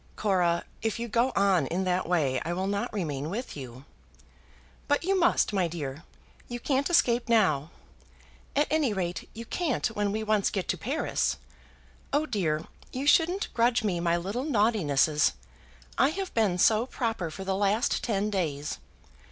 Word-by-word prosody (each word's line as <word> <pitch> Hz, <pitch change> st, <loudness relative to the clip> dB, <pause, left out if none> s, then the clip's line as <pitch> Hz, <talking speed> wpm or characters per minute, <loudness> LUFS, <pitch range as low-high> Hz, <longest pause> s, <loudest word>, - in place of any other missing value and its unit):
"Cora, 180 Hz, -5 st, +1 dB, 0.2 s
if 225 Hz, 0 st, -1 dB
you 235 Hz, 0 st, -3 dB
go 235 Hz, +4 st, +2 dB
on 195 Hz, -2 st, +3 dB
in 185 Hz, +3 st, -1 dB
that 180 Hz, -1 st, 0 dB
way 145 Hz, -7 st, +1 dB
I 170 Hz, -, -2 dB
will 185 Hz, +2 st, -2 dB
not 200 Hz, +1 st, -2 dB
remain 150 Hz, -7 st, -3 dB
with 235 Hz, +8 st, -5 dB
you." 130 Hz, -1 st, -9 dB, 1.0 s
"But 290 Hz, +2 st, +2 dB
you 385 Hz, +2 st, +2 dB
must, 345 Hz, -10 st, +3 dB
my 190 Hz, -3 st, +2 dB
dear. 155 Hz, -2 st, -6 dB, 0.4 s
You 240 Hz, 0 st, -5 dB
can't 275 Hz, +4 st, 0 dB
escape 240 Hz, -9 st, +3 dB
now. 165 Hz, -10 st, +3 dB, 0.9 s
At 290 Hz, -, +4 dB
any 300 Hz, -7 st, +2 dB
rate, 180 Hz, -3 st, -3 dB
you 230 Hz, +1 st, -7 dB
can't 315 Hz, 0 st, -1 dB
when 205 Hz, -2 st, -1 dB
we 220 Hz, +1 st, -2 dB
once 215 Hz, -2 st, +2 dB
get 190 Hz, -4 st, -3 dB
to -, -, +2 dB
Paris. -, -, -1 dB, 0.7 s
Oh 295 Hz, +2 st, +2 dB
dear! 165 Hz, -, -1 dB, 0.3 s
you 260 Hz, +2 st, -3 dB
shouldn't 345 Hz, +6 st, +3 dB
grudge 235 Hz, 0 st, +2 dB
me 185 Hz, -5 st, 0 dB
my 170 Hz, 0 st, +1 dB
little 200 Hz, +9 st, -3 dB
naughtinesses. 205 Hz, -, +2 dB, 0.7 s
I 270 Hz, -, +5 dB
have 380 Hz, +3 st, -4 dB
been 210 Hz, -6 st, +2 dB
so 220 Hz, +6 st, +4 dB
proper 225 Hz, -10 st, -2 dB
for 190 Hz, +5 st, -7 dB
the 190 Hz, 0 st, -1 dB
last 205 Hz, +4 st, +1 dB
ten 210 Hz, -2 st, 0 dB
days. 150 Hz, -7 st, -2 dB
205 Hz, 165 wpm, -28 LUFS, 170-240 Hz, 1.0 s, I